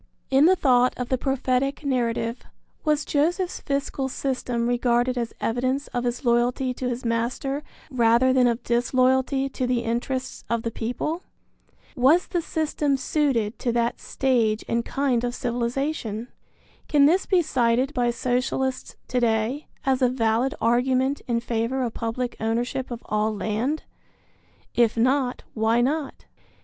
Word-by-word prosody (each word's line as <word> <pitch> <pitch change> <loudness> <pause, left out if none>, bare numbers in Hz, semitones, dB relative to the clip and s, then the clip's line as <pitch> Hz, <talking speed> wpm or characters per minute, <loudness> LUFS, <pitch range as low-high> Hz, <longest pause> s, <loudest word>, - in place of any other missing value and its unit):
In 270 +3 +6
the 375 - +5
thought 250 -6 +3
of 250 -1 -4
the 260 - +1
prophetic 270 +1 0
narrative, 235 -3 -1 0.4
was 300 -1 +1
Joseph's 350 +5 0
fiscal 275 -1 -2
system 250 -3 -2
regarded 245 +1 +1
as 235 -2 -2
evidence 255 +4 -1
of 245 0 -2
his 245 +3 -2
loyalty 245 +2 +2
to 250 0 -3
his 245 0 -4
master 240 +5 -1 0.3
rather 240 +1 +4
than 255 -1 +4
of 235 0 -1
disloyalty 255 +3 +2
to 255 -1 -2
the 245 -1 +1
interests 245 +3 -3
of 230 -1 0
the 230 - -2
people? 250 +10 -3 0.7
Was 290 +7 +4
the 350 - -1
system 305 -3 0
suited 260 -6 0
to 240 - 0
that 235 0 0
stage 230 -5 +1
and 235 0 0
kind 260 -3 0
of 245 0 -2
civilization? 240 -1 -2 0.6
Can 285 -2 +5
this 355 +6 +3
be 365 -3 +3
cited 255 -1 +1
by 245 -3 +1
Socialists 255 +2 -1
to 250 - +1
day 235 +4 0 0.2
as 265 -1 +2
a 250 - +4
valid 240 +1 +1
argument 255 +4 +2
in 235 -1 +1
favor 235 +3 -1
of 235 -2 -2
public 240 +2 -3
ownership 240 +4 -1
of 240 -2 -6
all 215 +1 0
land? 220 +9 -1 0.9
If 235 -1 +2
not, 255 +2 +1
why 225 +1 +2
not? 280 +3 -1
250 Hz, 145 wpm, -24 LUFS, 235-270 Hz, 0.9 s, In